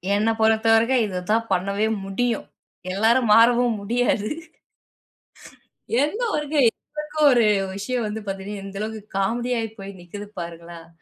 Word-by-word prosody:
என்ன 215 +2 +2
பொறுத்தவரைக்கும் 225 +3 +3
இததான் 210 +4 -1
பண்ணவே 200 +3 0 0.2
முடியும். 230 +4 -1 0.5
எல்லாரும் 225 +4 +3
மாறவும் 235 0 +5
முடியாது. 220 -1 0 1.7
எந்த 415 +11 -2
வொர்க் 300 0 -2
என்ன 300 +5 -1 0.2
ஒரு 240 -3 +4 0.3
விஷயம் 230 +4 -2
வந்து 215 +1 -5
பாத்தீங்கன்னா, 195 +1 -5
இந்த 195 0 -8
அளவுக்கு 220 0 -4 0.2
காமெடி 235 +6 -1
ஆகி 225 - -3
போய் 195 0 -8
நிக்குது 205 +4 -9
பாருங்களேன். 170 0 -8
220 Hz, 120 wpm, -23 LUFS, 195-240 Hz, 1.7 s, மாறவும்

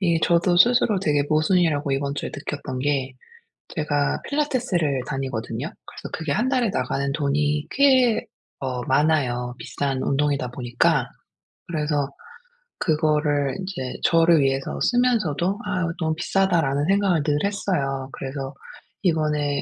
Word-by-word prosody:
이 170 -4 +2
저도 175 +1 +3
스스로 235 0 +4
되게 145 -5 +2
모순이라고 155 -2 +2
이번 140 +1 -1
주에 - - -4
느꼈던 145 -3 -5
게 135 -2 -1 0.5
제가 145 -3 -1
필라테스를 235 - 0
다니거든요. 130 -1 -3 0.2
그래서 - - -9
그게 160 -3 -2
1 240 - +1
달에 250 -6 +1
나가는 140 -8 -1
돈이 145 0 0
꽤 260 -5 +4 0.4
어 125 -2 -2
많아요 130 -4 +1
비싼 135 -2 -3
운동이다 140 -2 0
보니까. 125 +3 +1 0.6
그래서 150 -3 -1 0.7
그거를 150 -5 +1
이제 175 -10 -5
저를 165 -1 +5
위해서 135 0 0
쓰면서도 215 - +1
'아 185 -4 -1
너무 160 -1 +1
비싸다.'라는 165 -6 +1
생각을 195 -6 +2
늘 145 -1 +1
했어요. 140 -10 -1
그래서 135 0 -5 0.5
이번에 150 -5 +1
150 Hz, 295 characters per minute, -23 LUFS, 140-180 Hz, 0.7 s, 저를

